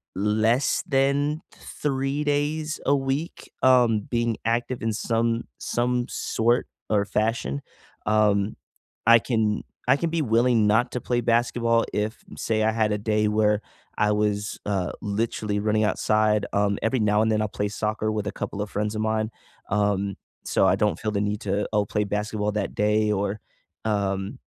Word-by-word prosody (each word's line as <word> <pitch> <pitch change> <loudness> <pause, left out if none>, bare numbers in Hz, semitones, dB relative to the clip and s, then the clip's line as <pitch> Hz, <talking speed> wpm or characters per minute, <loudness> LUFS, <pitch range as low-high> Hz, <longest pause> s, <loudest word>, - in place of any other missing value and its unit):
less 110 +6 +2
than 140 +3 +1
3 135 0 -2
days 150 +2 -1
a 140 - +4
week, 135 +4 -3
um, 125 -4 +5
being 115 +1 -1
active 120 +2 -1
in 115 - +1
some 115 +1 0
some 120 0 0
sort 120 +2 0 0.2
or 105 -2 +2
fashion. 105 - -1 0.4
Um, 105 -1 +2 0.5
I 115 0 +8
can 110 -3 0 0.2
I - - +6
can 165 +2 -1
be 165 0 0
willing 115 -3 +3
not 115 +4 +3
to 125 - -2
play 120 -1 0
basketball 115 0 +2
if, 105 +1 -2
say, 110 -1 0
I 110 - +3
had 110 -1 +1
a - - 0
day 105 0 +1
where 105 0 +2 0.4
I 105 0 +3
was, 105 0 -1
uh, 95 -3 -1
literally 105 0 -1
running 110 +1 +1
outside, 105 0 +2
um, 100 0 +2
every 120 +2 +1
now 105 0 +3
and 110 - +1
then, 110 - +2
I'll 110 - 0
play 105 - -2
soccer 110 +1 -1
with 105 -1 -2
a 105 - -1
couple 100 - -5
of 105 - -3
friends 105 +1 -2
of 110 - -1
mine, 110 0 0 0.4
um, 100 -1 +1 0.3
so - - +3
I - - +4
don't 105 -6 0
feel 110 - -2
the 100 - -1
need 105 0 -2
to, 100 +1 -1
oh, 105 -1 +2
play 105 0 -1
basketball 105 +1 -1
that 105 -2 -2
day 105 0 +2
or, 100 +1 -1 0.5
um 100 -2 -1
110 Hz, 170 wpm, -25 LUFS, 105-120 Hz, 0.5 s, I